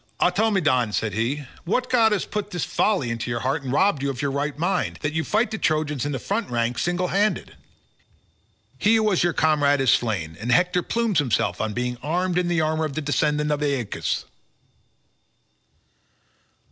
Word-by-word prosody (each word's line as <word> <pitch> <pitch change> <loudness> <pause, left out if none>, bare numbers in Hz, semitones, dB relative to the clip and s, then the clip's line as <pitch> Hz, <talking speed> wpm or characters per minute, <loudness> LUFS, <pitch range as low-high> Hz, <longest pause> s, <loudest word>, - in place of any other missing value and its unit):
"Automedon," 180 - +2
said 105 0 -1
he, 125 +7 -1 0.2
"what 250 +8 0
god 230 -3 +4
has 210 - 0
put 210 -1 -4
this 175 -5 -3
folly 180 - 0
into 115 +1 -4
your 120 0 -2
heart 135 +4 -1
and 130 -2 -5
robbed 155 0 +2
you 140 - 0
of 130 -3 -5
your 140 0 -1
right 145 +1 -2
mind, 175 +5 -1
that 145 0 -1
you 160 0 0
fight 215 +5 +1
the 220 - -4
Trojans 155 -4 0
in - - -2
the 135 - -2
front 205 - -2
rank 120 0 -1
single 175 +1 0
handed? 205 +3 0 1.2
He 215 +2 +4
who 220 - +3
was 210 -5 +2
your 175 -1 +1
comrade 145 -2 +3
is 135 -2 +3
slain, 95 -9 0
and 120 +2 -2
Hector 180 +7 +3
plumes 230 -2 0
himself 130 -6 0
on 110 - -2
being 125 +1 -3
armed 180 +3 0
in 180 - 0
the 170 -2 +1
armour 155 0 0
of 150 - -4
the 155 - -3
descendant 150 0 0
of 150 0 -1
Aeacus." 140 -7 -1
150 Hz, 185 wpm, -23 LUFS, 130-185 Hz, 1.2 s, god